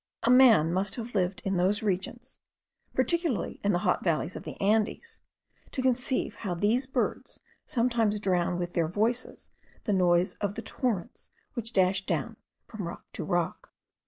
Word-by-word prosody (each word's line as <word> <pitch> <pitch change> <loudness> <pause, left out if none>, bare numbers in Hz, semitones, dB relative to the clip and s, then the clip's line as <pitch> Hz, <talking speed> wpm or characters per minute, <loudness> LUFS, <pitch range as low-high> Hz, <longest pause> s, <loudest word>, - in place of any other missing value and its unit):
A 235 - +4
man 225 -11 +6
must 190 +2 0
have 240 0 -6
lived 185 -2 0
in 195 -1 0
those 195 +4 +2
regions, 215 +6 -3 0.6
particularly 335 - 0
in 205 - +3
the 175 - +2
hot 180 - +2
valleys 170 0 0
of - - -7
the - - -8
Andes, 220 - 0 0.5
to 260 - -3
conceive 255 0 0
how 185 -5 -3
these 225 +9 +1
birds 265 - -2 0.3
sometimes 230 -5 +1
drown 180 -3 +1
with 175 0 -3
their 165 -2 +1
voices 225 +8 -1 0.3
the 210 - 0
noise 180 -1 +3
of 205 0 -1
the - - -5
torrents, 225 -10 -3 0.2
which 230 -2 -4
dash 190 -1 +2
down - - -2 0.3
from 205 -6 -6
rock 170 - -8
to - - -3
rock. 175 -2 -2
205 Hz, 160 wpm, -28 LUFS, 180-240 Hz, 0.6 s, man